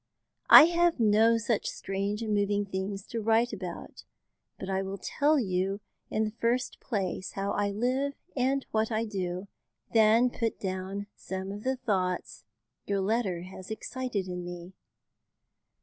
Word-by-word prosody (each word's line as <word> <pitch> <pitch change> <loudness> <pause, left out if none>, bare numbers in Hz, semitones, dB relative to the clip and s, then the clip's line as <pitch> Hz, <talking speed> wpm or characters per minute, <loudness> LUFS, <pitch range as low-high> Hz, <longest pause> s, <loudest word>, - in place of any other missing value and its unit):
I - - +12
have 345 -1 +3
no 225 +1 +5
such 225 -1 -1
strange 200 +3 -3
and 215 -1 -1
moving 205 0 +1
things 195 +1 -4
to 230 - -4
write 225 +2 +2
about, 185 -4 -7 0.5
but 190 - -6
I 190 0 0
will 195 +1 -4
tell 295 +10 +1
you 195 -2 -1 0.3
in 220 - 0
the 215 - -2
first 235 +3 -1
place 190 -5 -3
how 200 0 -2
I 205 0 0
live 255 +7 0 0.2
and 270 +1 +1
what 220 +1 +1
I 220 +1 0
do, 185 -2 -4 0.5
then 225 +2 +5
put 230 -2 -2
down 190 +1 -4
some 190 0 -5
of 205 +1 -7
the 260 +1 0
thoughts 185 -7 -2 0.4
your 200 -1 0
letter 195 -4 0
has 185 0 -10
excited 220 -3 -3
in 180 -1 -4
me. 175 +1 -8
205 Hz, 150 wpm, -29 LUFS, 190-230 Hz, 0.5 s, I